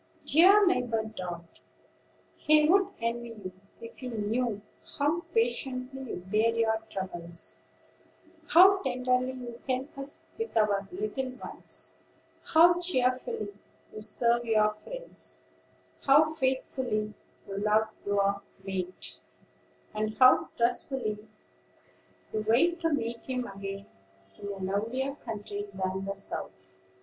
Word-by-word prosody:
"Dear 390 +6 +7
neighbor 245 -11 +1
Dart, 175 -6 -7 0.8
he 300 0 +4
would 385 +3 +5
envy 235 +1 -2
you, 185 -3 -7 0.3
if 230 0 -10
he 255 - -5
knew 225 -1 -1 0.3
how 300 +4 +1
patiently 255 +3 -1
you 180 - -6
bear 215 +4 +2
your 220 -1 +2
troubles; 175 -4 -5 0.9
how 380 +4 +7
tenderly 255 0 0
you 245 -2 -8
help 260 +2 -2
us 275 +1 -6
with 450 - -2
our 205 -2 +2
little 360 -9 -3
ones; 255 - -5 0.5
how 345 +2 +6
cheerfully 255 - 0 0.4
you 215 - -7
serve 235 +2 +2
your 215 -2 +3
friends; - - -8 0.6
how 290 +3 +6
faithfully 260 -7 -1 0.3
you 195 - -5
love 215 +1 +3 0.2
your 205 0 -1
lost 200 0 +2 0.2
mate; 185 -2 -4 0.7
and 215 0 -2
how 255 0 +6
trustfully 235 -3 -1 1.1
you 215 - -1
wait 340 +10 +4
to 330 -1 +1
meet 235 -5 -2
him 255 -1 -1
again 195 -1 -6 0.5
in 200 - -6
a 200 -1 -4 0.2
lovelier 255 +7 -1
country 205 -5 -6
than 190 0 -2
the 195 0 -3
South." 95 - -7
235 Hz, 120 wpm, -29 LUFS, 205-270 Hz, 1.1 s, Dear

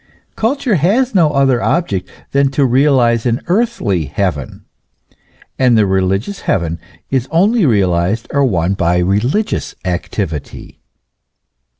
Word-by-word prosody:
Culture 255 +1 0
has 220 - +1
no 170 -6 +4
other 135 -4 +2
object 100 - -1 0.2
than 140 0 +2
to 140 - +4
realize 125 -3 +2
an 120 +1 0
earthly 175 - 0
heaven; 75 -1 -3 0.9
and 125 -3 +4
the 105 - +4
religious 95 - -1
heaven 85 -2 -1 0.3
is 130 -1 0
only 195 +3 +2
realized 95 -1 +1
or 140 - +2
won 95 -7 +1
by 90 -2 +1
religious 105 - -1
activity. 90 -4 -5
120 Hz, 115 wpm, -15 LUFS, 95-155 Hz, 0.9 s, no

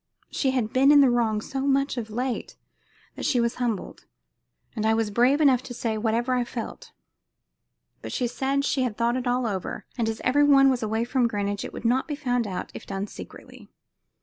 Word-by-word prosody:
She 270 - 0
had 250 -4 -1
been 270 +2 +5
in 290 -1 +7
the 265 -3 +5
wrong 225 -3 +1
so 270 +4 -4
much 275 0 +1
of 230 -3 -5
late 245 +3 -3 0.6
that - - -8
she 250 - +2
was 235 0 0
humbled; 230 -5 -3 0.7
and 215 - -2
I 220 0 +3
was 225 -2 -1
brave 250 +7 +3
enough 270 -5 +4
to 245 -1 -9
say 225 -2 -2
whatever 230 +3 0
I 250 -1 +1
felt; 235 -1 -7 1.1
but - - -7
she 250 - -1
said 270 +3 -1
she 275 - 0
had 245 -5 -2
thought 235 +1 +1
it 255 -1 -2
all 245 0 +1
over, 195 -5 -4
and 225 -1 +1
as 225 - -4
every 285 +3 +3
one 275 -2 +6
was 255 - -1
away 220 +1 -1
from 245 0 +1
Greenwich 205 -2 -2
it - - -6
would - - -9
not 250 +3 +2
be 295 - -3
found 245 -5 -1
out 185 -2 -5
if - - -10
done 195 +1 -3
secretly. - - -12
245 Hz, 210 wpm, -25 LUFS, 220-265 Hz, 1.1 s, in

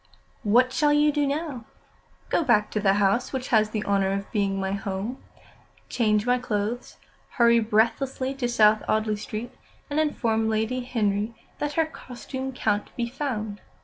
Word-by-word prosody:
"What 245 +4 +3
shall 300 -2 +3
you 295 0 +4
do 290 -1 +1
now?" 280 -5 -3 0.6
"Go - - +2
back 215 -6 +3
to 215 - -1
the 195 -1 +3
house 205 +4 +2
which 260 -1 -4
has 215 -2 +4
the 215 -1 -3
honour 195 -1 +2
of 200 0 -4
being 200 -2 0
my 190 0 -2
home, 200 +5 -4 0.7
change 215 -3 +1
my 250 0 +2
clothes, 220 +1 -3 0.4
hurry 235 -1 +5
breathlessly 240 +5 +1
to 260 -3 -2
South 215 -2 +4
Audley 215 0 +1
Street, 215 +3 -6 0.4
and 295 - +1
inform 225 -7 +1
Lady 220 +3 0
Henry 220 -3 -1 0.2
that 295 0 -2
her 325 +1 +2
costume 265 -2 -7
can't 210 -5 -1
be 235 -1 -1
found. 225 -6 -4
230 Hz, 160 wpm, -25 LUFS, 210-260 Hz, 0.7 s, hurry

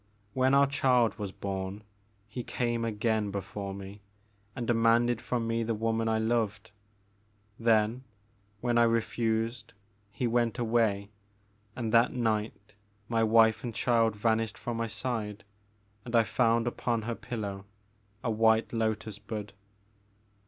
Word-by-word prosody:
When 130 +2 +3
our 140 0 +6
child 125 -5 +2
was 100 -2 -4
bom, 95 +1 -5 0.4
he 115 +4 -6
came 120 -1 -1
again 110 -1 0
before 100 0 -5
me 100 +1 -9 0.5
and 120 -3 -3
demanded 115 0 +3
from 120 -2 -2
me 115 0 0
the 115 0 -1
woman 115 +1 0
I 110 - +2
loved. 110 -2 -1 0.9
Then, 115 +2 +2 0.6
when 120 -1 +2
I - - +6
re 115 0 +3
fused, 115 +1 -2 0.4
he 125 - -3
went 120 -1 +1
away, 110 -4 +1 0.6
and 115 -3 -3
that 115 +1 +5
night 110 -4 -2 0.4
my 115 -1 +1
wife 110 0 +4
and 120 -3 -5
child 115 -2 +2
vanished 110 +1 0
from 120 -1 -4
my 115 0 -1
side, 110 -2 -4 0.6
and 120 +2 -4
I 115 - +6
found 115 0 +2
upon 120 -1 -1
her 120 +2 -2
pillow 105 -5 -5 0.6
a 115 - 0
white 110 +1 +3
lotus 110 -2 -2
bud. 105 -1 -6
115 Hz, 140 wpm, -29 LUFS, 105-120 Hz, 0.9 s, our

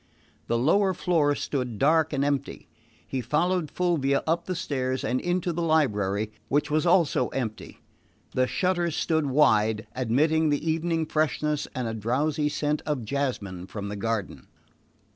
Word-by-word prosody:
The 115 - +1
lower 185 +9 +3
floor 155 -5 +2
stood 125 -7 -3
dark 155 +6 +3
and 140 -1 0
empty. 140 -1 -2 0.4
He 130 - -2
followed 155 +6 0
Fulvia 150 -6 +1
up 165 +2 0
the 185 - -3
stairs 130 -6 -2
and 130 +1 0
into 175 0 -1
the 170 - -2
library, 110 - +1 0.2
which 145 +2 0
was 155 +3 +2
also 170 -3 +3
empty. 115 -5 -5 0.5
The 130 0 +1
shutters 175 -2 0
stood 160 -3 0
wide, 110 -6 +3
admitting 150 +6 +2
the 145 +2 -1
evening 165 0 0
freshness 150 -1 0
and 125 -2 -2
a 115 - -3
drowsy 140 +7 0
scent 150 0 -1
of 140 -7 -2
jasmine 105 -9 -3
from 100 -1 -6
the 105 - -4
garden. 105 -1 -3
145 Hz, 150 wpm, -26 LUFS, 125-160 Hz, 0.5 s, lower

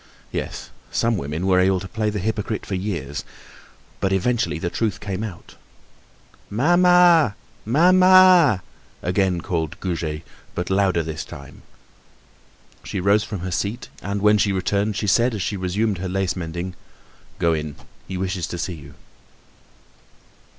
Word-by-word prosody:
Yes, - - -5 0.2
some 115 0 +1
women 75 +1 -3
were 95 -1 +4
able 95 0 +3
to 95 - -7
play 110 +1 -1
the 105 - -3
hypocrite 105 +1 -2
for - - -5
years, 90 -7 -3 0.8
but 95 - 0
eventually 95 -5 +1
the 85 +1 -3
truth 110 -4 -1
came 100 0 -4
out. 100 -6 -9 0.9
"Mamma! 175 - +5 0.3
Mamma!" 180 - +6 0.4
again 90 -1 +1
called 80 -2 -3
Goujet, 80 -4 -3 0.3
but 90 - -3
louder 95 -3 +2
this 80 0 -5
time. 70 0 -11 1.2
She - - -4
rose 100 +3 +3
from 100 -5 -6
her 95 0 -4
seat 105 +7 -3
and 100 0 -3
when 105 0 +5
she 100 - +2
returned 100 +2 0
she 105 - -2
said, 115 +4 +3
as 100 - -2
she 105 - -2
resumed 95 +2 -1
her 95 0 -3
lace 95 0 -1
mending: 90 +1 -5 0.6
"Go 85 -1 +2
in, 75 -2 -3 0.3
he 95 - -4
wishes 90 -2 -2
to 85 - -5
see 90 +1 -3
you." 75 -3 -12
95 Hz, 145 wpm, -22 LUFS, 90-110 Hz, 1.2 s, Mamma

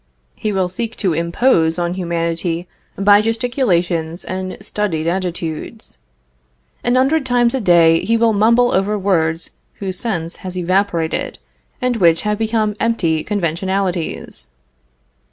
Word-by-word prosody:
He 215 - -3
will 190 -2 +1
seek 230 +5 -5
to 185 -5 0
impose 170 0 +2
on 175 0 -1
humanity 170 -1 -2 0.3
by 205 +1 +5
gesticulations 190 - 0
and 185 0 -4
studied 200 -5 -2
attitudes; 175 +3 -4 0.8
an 245 +1 +2
hundred 275 +4 +3
times 245 -2 +2
a 265 - -1
day 170 -3 +5
he 230 +4 +2
will 230 -1 +3
mumble 235 +4 +4
over 200 +3 +1
words 165 -4 0 0.2
whose 190 -2 -5
sense 175 -8 -2
has 185 -1 -7
evaporated 180 -2 0 0.4
and 250 -2 0
which 170 -5 +3
have 210 0 -1
become 220 -1 0
empty 170 -9 +1
conventionalities. 190 -1 -2
190 Hz, 125 wpm, -18 LUFS, 170-220 Hz, 0.8 s, by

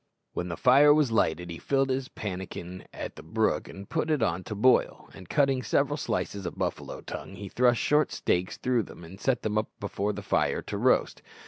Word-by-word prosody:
When 90 - -3
the 85 - -4
fire 145 +4 +6
was 150 -6 +2
lighted 85 -5 +1
he 85 - -7
filled 135 -1 +1
his 130 0 -2
pannikin 95 -2 -6
at - - -6
the - - -9
brook - - 0
and 100 0 -9
put 160 - -1
it 150 -6 +2
on 90 -3 0
to 110 -3 -5
boil, 125 +5 +3
and 95 -2 -12
cutting 135 -3 +2
several - - +1
slices 100 -3 -3
of 85 - -7
buffalo - - -3
tongue, 95 - -7
he 100 +1 -7
thrust 120 +1 +3
short 150 +1 +3
stakes 90 +1 -1
through 125 -2 +1
them 90 - -10
and 90 +4 -12
set 135 -2 +1
them 105 0 +1
up 110 - -3
before 100 0 -2
the - - -7
fire - - +1
to - - -5
roast. - - +2
105 Hz, 210 wpm, -28 LUFS, 95-130 Hz, -, fire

